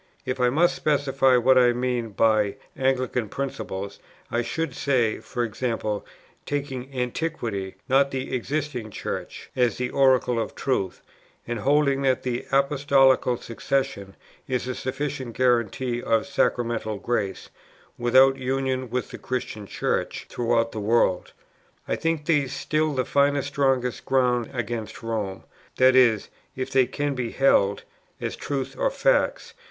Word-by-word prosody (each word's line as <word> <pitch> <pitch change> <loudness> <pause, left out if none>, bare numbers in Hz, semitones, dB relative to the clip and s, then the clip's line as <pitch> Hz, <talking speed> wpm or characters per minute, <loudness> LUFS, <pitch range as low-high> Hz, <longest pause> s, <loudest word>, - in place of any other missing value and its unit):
If 130 +1 -3
I 125 0 +4
must 165 +7 +3
specify 135 -3 +2
what 130 +2 +5
I 120 -1 +5
mean 125 -2 -1
by 105 -1 +2 0.2
'Anglican 130 -4 0
principles,' 100 -7 -5 0.3
I 120 - +1
should 160 +7 -3
say, 120 -6 +1
e.g. 120 0 -2 0.7
taking 140 -2 -4
Antiquity, 125 - -3
not 135 +1 +4
the 130 -1 -3
existing 130 -2 -3
Church, - - -6
as 125 -2 +2
the 125 0 -2
oracle 130 -3 +3
of 115 - -3
truth; 100 -9 -2 0.4
and 120 -1 -3
holding 140 +2 +2
that 130 -2 +1
the 125 -1 -3
Apostolical 135 -2 +3
Succession 115 -5 -3 0.3
is 125 -1 -1
a 130 - -2
sufficient 130 -2 -4
guarantee 120 0 +1
of 115 -2 +1
Sacramental 120 -5 0
Grace, 100 -3 -2 0.4
without 130 +3 +5
union 130 -1 -1
with 125 +2 -3
the - - -8
Christian 120 -5 -4
Church - - -2
throughout 115 -1 +1
the 110 - -5
world. 105 -4 +1 0.6
I - - 0
think 165 -2 -1
these 145 -5 +1
still 155 0 0
the 130 -1 0
firmest, 140 0 +2
strongest 135 -3 0
ground 125 -3 +2
against 120 -4 -4
Rome 105 -4 -3 0.3
that 130 0 +5
is, 120 -5 +4 0.3
if 130 0 -4
they 130 -2 +4
can 145 +2 -2
be 125 -3 -3
held" 100 -7 +3 0.4
[as - - -3
truths 140 -2 -4
or - - +1
facts. - - +1
130 Hz, 135 wpm, -25 LUFS, 120-135 Hz, 0.7 s, what